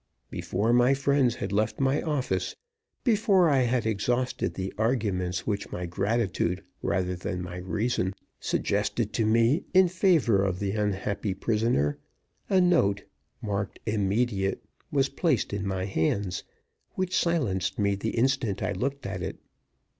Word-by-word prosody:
Before 110 +4 0
my 125 +3 +5
friends 140 -3 +2
had 100 - -4
left 105 +2 0
my 135 +1 +2
office 130 - -1 0.5
before 205 - +4
I 135 - +4
had 125 -2 +1
exhausted 120 +4 0
the 95 0 -4
arguments 100 -6 0
which 105 -2 -2
my 90 - -4
gratitude 95 -1 -1 0.2
rather 90 -1 0
than 90 0 -4
my 90 0 -6
reason 95 +1 -1 0.2
suggested 105 +2 -1
to 110 -2 +1
me 115 +8 +3
in 190 0 +7
favor 170 - +3
of 95 -2 0
the 100 0 -2
unhappy 100 -1 -1
prisoner 105 - +1 0.5
a 190 - +4
note, 160 - +3 0.4
marked 100 -2 -3
immediate, 105 -1 0 0.3
was 140 -2 +2
placed 140 - 0
in 100 -1 -2
my 95 -1 -1
hands, 95 0 -1 0.5
which 185 0 -1
silenced 130 - 0
me 100 -1 +2
the 105 +4 -3
instant 120 -5 +1
I 95 - 0
looked 140 +5 -3
at 95 -2 -4
it. - - -4
110 Hz, 140 wpm, -27 LUFS, 95-130 Hz, 0.5 s, in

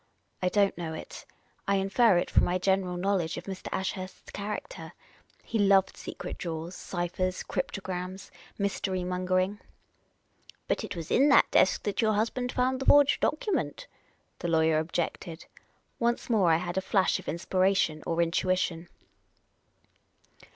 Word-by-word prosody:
" - - -44
I 180 - +2
don't 200 0 +2
know 160 -2 -4
it. - - -9 0.4
I 200 - +3
infer 195 +1 +3
it 175 - -1
from - - +4
my 180 - +1
general 185 -1 0
knowledge 180 -3 0
of - - -6
Mr. 190 -1 -7
Ashurst's 190 0 -4
character. 210 - -6 0.5
He 225 - -2
loved 195 -1 +4
secret - - -7
drawers, 165 0 -5
ciphers, 185 0 -3
cryptograms, 185 0 -4 0.3
mystery 190 -2 -1
mongering." 185 +2 0 0.5
" - - -27
But - - 0
it - - -5
was 165 -2 -6
in 280 +4 +5
that 280 - +5
desk - - +3
that 205 +2 -1
your 215 -1 +3
husband 240 +4 -1
found 255 +1 0
the 270 - -4
forged 285 -1 +6
document," 375 +7 -1 0.5
the - - -3
lawyer 160 -1 +3
objected. 165 +1 -4 0.5
Once 235 +1 0
more 195 -7 +4
I 160 - +5
had 175 +2 -2
a - - -4
flash 190 0 +2
of - - -13
inspiration 185 -1 +1
or 170 0 +2
intuition. 175 0 0
185 Hz, 150 wpm, -28 LUFS, 175-200 Hz, 0.5 s, forged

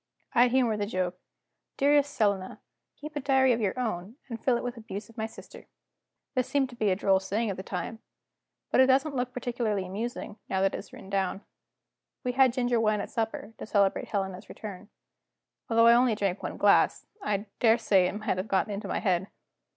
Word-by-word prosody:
I 240 +1 +6
humored 240 -4 +2
the 205 - -1
joke: 185 -2 -2 0.6
"Dearest 285 0 +4
Selina, 200 -5 0 0.4
keep 300 +1 -9
a - - 0
diary 265 -2 +4
of 230 - -1
your 205 +4 -1
own, 215 -3 -3
and 230 -2 -6
fill 250 -3 +3
it - - -5
with 245 0 -3
abuse 215 -2 -7
of 230 - -17
my 220 - -1
sister." - - -13 0.7
This 255 -2 0
seemed 270 -2 +1
to - - -11
be 215 -3 +1
a 185 - +3
droll 190 0 +3
saying 200 +3 -1
at - - -4
the - - -4
time. 190 +4 -5 0.7
But - - +5
it 260 - +6
doesn't 275 +2 +3
look 250 -1 -1
particularly 235 -5 -2
amusing, 210 +2 -5
now 190 0 +1
it 195 - +2
is - - -7
written 190 - -11
down. 195 0 0 0.8
We 250 - 0
had 260 0 +5
ginger 245 -1 +1
wine 215 -1 +2
at 200 - -5
supper, 225 -1 -3
to - - -5
celebrate 200 -3 +2
Helena's 190 -1 -3
return. 205 -1 -8 0.8
Although 230 0 +5
I 235 - +8
only 240 -1 +4
drank 200 -2 -1
one - - -5
glass, - - +4 0.2
I 205 - -1
daresay 220 -5 +4
it - - -3
may 215 +1 -7
have 190 -2 -1
got 195 +1 +1
into 200 +2 -4
my - - -1
head. 190 -2 +1
220 Hz, 200 wpm, -28 LUFS, 195-245 Hz, 0.8 s, I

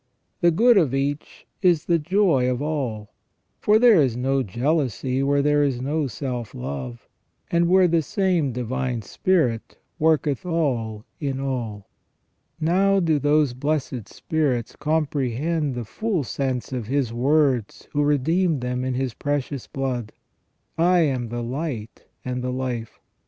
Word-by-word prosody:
The 175 - +5
good 225 +6 +5
of 140 -7 +1
each 140 +2 -3 0.2
is 175 -5 +3
the 170 -1 +2
joy 165 -6 +2
of 125 -1 -1
all, 130 -8 -3 0.5
for 210 +1 +4
there 225 -7 +6
is 125 -4 +1
no 135 +2 +1
jealousy 130 - -1
where 140 +1 +2
there 145 0 +3
is 135 -4 0
no 145 +3 -1
self 125 -2 -5
love, 65 -1 -6 0.4
and 170 0 +3
where 185 0 +5
the 165 -1 +2
same 175 -2 0
Divine 125 -1 -3
Spirit 125 - 0 0.2
worketh 155 0 +2
all 125 -11 -1
in 135 -3 -2
all. 120 -7 -3 0.7
Now 190 +5 +3
do 160 -4 +2
those 145 -2 +2
blessed 130 -4 -2
spirits 140 -7 -1
comprehend 150 -1 -1
the 120 -2 -4
full 200 - -2
sense 130 0 -3
of 120 -4 -3
His 130 -3 0
words 130 -2 +1
who 145 - 0
redeemed 150 +2 +2
them 125 0 -2
in 130 -1 -1
His 130 -2 -2
precious 140 -1 -3
blood: 125 -5 -3 0.4
" - - -47
I 175 +1 +4
am 130 -6 0
the 120 +1 -4
light 125 -3 -5 0.2
and 125 0 -3
the 125 - -2
life 125 -3 -4
". - - -48
140 Hz, 150 wpm, -23 LUFS, 125-160 Hz, 0.7 s, there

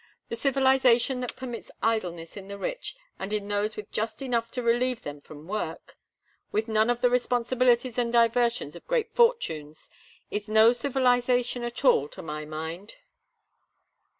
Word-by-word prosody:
The - - -3
civilization 265 -1 +3
that 250 -1 -3
permits 245 -3 -7
idleness 175 -7 -1
in 195 -2 -9
the 200 0 -7
rich - - -4 0.2
and 195 +2 -5
in 210 -1 -2
those 205 +1 -1
with 210 - -8
just 220 +4 -3
enough 235 -3 -1
to 250 - -3
relieve 240 +1 +1
them 145 0 -7
from 150 +2 -13
work, 185 -5 -4 0.6
with 220 +2 0
none 220 +1 +2
of 245 0 0
the 245 - +4
responsibilities 245 0 +2
and 235 -1 0
diversions 235 -7 +2
of 170 - -12
great 475 -3 0
fortunes, 160 - 0 0.4
is 210 +1 -3
no 220 +2 +6
civilization 245 -1 +1
at 240 +3 -4
all, 145 - +5
to - - -11
my 150 -1 -5
mind. 160 +6 -6
230 Hz, 155 wpm, -27 LUFS, 200-250 Hz, 0.6 s, no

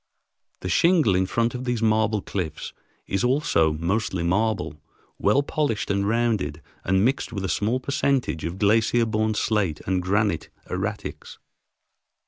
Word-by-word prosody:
The - - -4
shingle 160 - +4
in 95 0 +2
front 115 +3 0
of 125 0 -5
these 120 -2 -1
marble 110 -1 +2
cliffs 80 -6 -4 0.3
is 95 - -1
also 125 - +2
mostly 90 +3 -1
marble, 110 +6 0 0.4
well 120 +8 +3
polished 140 -9 -1
and 100 0 0
rounded 110 -9 0 0.2
and 95 +3 +2
mixed 130 -1 0
with 100 -4 -3
a - - -1
small 110 +7 0
percentage 135 - 0
of 85 +3 -4
glacier 110 +3 +3
borne 110 0 0
slate 100 -8 0
and 95 -1 0
granite 100 -2 0 0.2
erratics. 100 +3 -5
105 Hz, 140 wpm, -24 LUFS, 95-115 Hz, 0.4 s, shingle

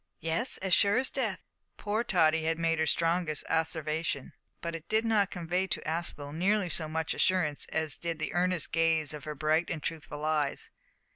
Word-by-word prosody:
"Yes; 165 +11 +2
as 190 -1 -1
sure 200 +5 +4
as 260 +1 +1
death." 220 -9 -2 0.3
Poor 215 +2 -1
Tottie 160 -7 +3
had 165 0 0
made 165 -1 0
her 160 - +1
strongest 165 -2 +1
asseveration, 160 -3 -1 0.3
but 170 0 -4
it 165 -1 -8
did 220 +1 +2
not 210 -3 +2
convey 180 +1 -2
to - - -2
Aspel 155 -3 -3
nearly 190 +3 +1
so 160 -1 +2
much 160 +1 -2
assurance 160 -6 +1
as 160 -2 0
did 170 -1 -3
the 155 - -3
earnest 180 -1 +1
gaze 165 -3 +3
of 150 -3 -8
her 150 -1 -5
bright 155 +3 +1
and 160 -4 -4
truthful 150 -2 -5
eyes. 150 -3 -1
165 Hz, 185 wpm, -30 LUFS, 155-185 Hz, 0.3 s, sure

